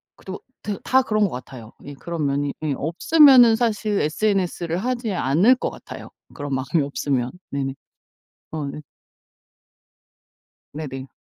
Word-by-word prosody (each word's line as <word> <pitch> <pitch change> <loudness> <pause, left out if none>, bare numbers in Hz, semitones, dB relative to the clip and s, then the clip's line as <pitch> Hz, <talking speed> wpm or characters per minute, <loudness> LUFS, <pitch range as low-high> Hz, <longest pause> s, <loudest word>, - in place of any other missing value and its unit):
그래도 190 0 -8 0.2
데 205 -2 -3
다 260 +1 +4
그런 215 -4 +1
것 200 - +2
같아요. 125 -2 -9
예 145 - -8
그런 165 +2 -4
면이 140 0 -1
예 150 -2 0
없으면 245 - +6
사실 215 -3 0
SNS를 175 0 0
하지 240 0 -2
않을 180 - +4
것 - - -3
같아요 - - -10 0.2
그런 145 -1 -5
마음이 135 +4 0
없으면. 135 -3 -2 0.2
네네. 135 -1 -2 0.8
어 155 -2 -4
네. 140 +2 -6 1.9
네네. 135 -3 -6
160 Hz, 255 characters per minute, -22 LUFS, 140-215 Hz, 1.9 s, 없으면